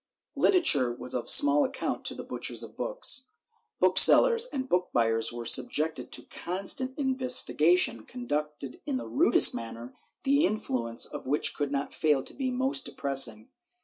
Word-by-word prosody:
Literature 145 - +3
was 125 +1 -6
of 125 -2 -4
small 145 +1 +5
account 270 - -5
to - - -3
the - - -8
butchers - - -5
of - - -13
books. - - +1 0.5
Booksellers 475 -1 +5
and 270 - -6
book 180 -5 -1
buyers 115 -1 0
were 120 0 -8
subjected 155 +6 0
to - - -1
constant 195 +9 -3
investi 260 -2 0
gation 160 -8 +1
conducted 150 - -6
in 275 -3 -2
the - - -7
rudest 345 +4 +4
manner, 115 +1 -9 0.3
the 280 +3 +1
influence 125 - -2
of - - -9
which 145 +3 0
could 145 -1 -4
not 140 0 -4
fail 150 -4 0
to - - -7
be 265 -2 -4
most 265 +2 -2
depressing. 135 -6 -1
160 Hz, 155 wpm, -27 LUFS, -, 0.5 s, small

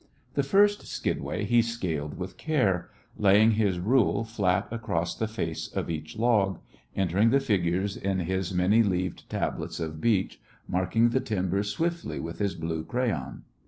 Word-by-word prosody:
The 140 - +2
first 205 +8 +3
skidway - - -2
he 120 0 +4
scaled 85 -11 -3
with 95 +1 -6
care, 115 - 0 0.3
laying 105 +2 +6
his 105 -4 +1
rule 115 +4 +2
flat 100 -4 0
across 100 -8 -2
the 110 - -2
face 85 -7 -3
of - - -3
each 80 -1 -6
log, 105 -5 +2 0.4
entering 95 +4 +3
the 135 +4 +4
figures 95 -5 0
on 95 0 0
his 95 +1 -2
many 95 +5 +4
leaved 95 -4 -1
tablets - - -3
of 80 -1 -4
beech, 105 -5 +1 0.3
marking 105 +6 +2
the 130 - +1
timbers 100 -4 -1
swiftly 170 +9 -2
with 85 +1 -6
his 100 -2 0
blue 80 -1 -3
crayon. 85 - -2
100 Hz, 155 wpm, -27 LUFS, 90-115 Hz, 0.4 s, laying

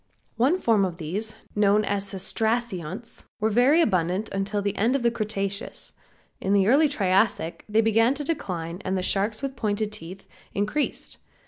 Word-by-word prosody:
One 270 +10 +3
form 225 - +3
of 180 -3 -2
these 200 +7 -3 0.2
known 210 0 +3
as 200 0 -1
Cestracionts 220 0 -2
were 220 +1 +1
very 260 +9 +5
abundant 185 - 0 0.2
till 205 -1 -2
the 200 - -1
end 235 +6 +2
of 270 - 0
the 235 - +3
Cretaceous. 200 -3 -3 0.5
In 195 - 0
the 200 -1 +4
early 280 +8 +5
Triassic 195 - +1
they 215 +2 +4
began 225 +4 +3
to 290 - -4
decline 180 - -3
and 190 0 -1
the 185 - -2
sharks, 210 +6 0
with 270 -1 -3
pointed 215 -2 -1
teeth, 185 0 -9 0.3
increased. 210 +9 -2
210 Hz, 160 wpm, -25 LUFS, 195-230 Hz, 0.5 s, very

